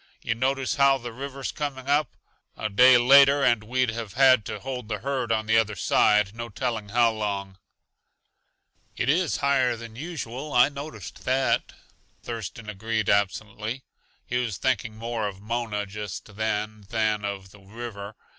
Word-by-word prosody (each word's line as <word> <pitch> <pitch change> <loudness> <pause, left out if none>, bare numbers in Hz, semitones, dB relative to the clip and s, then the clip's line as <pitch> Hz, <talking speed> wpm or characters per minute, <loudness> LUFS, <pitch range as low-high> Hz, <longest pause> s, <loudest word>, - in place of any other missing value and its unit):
Yuh 115 - 0
notice 130 +3 -1
how 140 -1 +5
the 120 -2 -8
river's 135 +1 -5
coming 140 -3 -5
up? 145 0 +1 0.4
A 110 - -2
day 125 +5 +7
later 140 +3 +6
and 120 -4 +3
we'd 125 +2 0
have 115 -3 -6
had 130 -3 +5
to - - -5
hold 125 -4 -6
the 105 -1 -2
herd 130 -3 -2
on 110 -1 +1
the 110 +1 +4
other 110 -1 -1
side, 105 +2 +3
no 115 0 -6
telling 110 -1 -3
how 115 +1 +4
long." 100 -3 -4 1.4
"It 125 - 0
is 170 +3 +2
higher 130 -3 +3
than 115 -1 -10
usual; 145 -2 -6
I 125 +3 +6
noticed 140 -9 -9
that," 130 +1 +1 0.5
Thurston 115 -1 -6
agreed 110 +1 -1
absently. 110 +4 -1 0.4
He 125 - -2
was 115 -6 -2
thinking 110 -4 -1
more 115 -1 -2
of 95 -1 -7
Mona 110 -1 -3
just 100 0 -7
then 110 0 -2
than 110 -2 0
of 100 -2 -5
the 105 - -16
river. 100 0 -8
115 Hz, 160 wpm, -25 LUFS, 105-130 Hz, 1.4 s, day